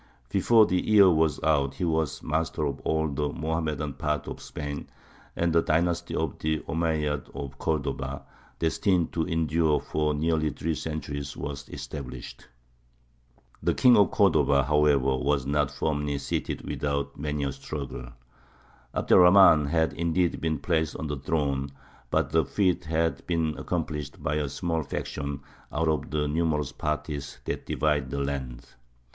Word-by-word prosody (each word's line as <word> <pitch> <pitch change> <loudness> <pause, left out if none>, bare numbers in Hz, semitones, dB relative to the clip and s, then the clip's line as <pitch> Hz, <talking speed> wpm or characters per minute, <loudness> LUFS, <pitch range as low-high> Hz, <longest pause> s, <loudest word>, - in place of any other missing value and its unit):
Before 110 +3 +5
the 90 -2 0
year 100 -3 +6
was 80 -2 +2
out 70 -3 +2
he 80 - -4
was 80 -5 -1
master 80 0 -1
of 70 -1 -3
all 80 0 0
the 75 0 -1
Mohammedan 80 -2 -2
part 75 +1 -2
of - - -6
Spain, 75 -1 -6 0.5
and 85 -1 +1
the 85 - +5
dynasty 85 +2 0
of 80 -4 -2
the 80 0 -1
Omeyyads 80 -3 -1
of 70 -1 -7
Cordova, 70 -3 -2 0.3
destined 85 +1 +1
to 80 0 -1
endure 80 -2 +2
for 75 -1 -1
nearly 80 0 +1
three 80 +2 -2
centuries, 70 -2 -5
was 70 -2 -6
established. 65 -4 -8 1.1
The - - +1
King 125 -2 +6
of 100 -2 +5
Cordova, 75 - +3
however, 70 -2 +3
was 70 0 0
not 70 0 +1
firmly 75 -1 -1
seated 70 - -3
without 70 -1 -2
many 75 0 -2
a 70 - -1
struggle. 70 -2 -6 0.9
Abd - - -2
er - - +9
Rahmān 90 -5 +7
had 80 -1 +1
indeed 85 +2 0
been 80 -1 0
placed 80 -3 0
on - - -4
the 75 -1 -3
throne, 70 -1 -1 0.4
but - - +1
the 80 0 +4
feat 90 +2 0
had 80 +1 0
been 80 -3 0
accomplished 75 -2 -4
by 75 +1 0
a 75 -2 -1
small 80 +2 -1
faction 70 -1 -4 0.3
out 80 +2 0
of 75 -3 0
the 75 +1 0
numerous 75 -2 0
parties 75 0 -4
that - - -4
divided 75 -3 0
the 70 - -4
land. 65 -3 -4
75 Hz, 150 wpm, -27 LUFS, 70-80 Hz, 1.1 s, er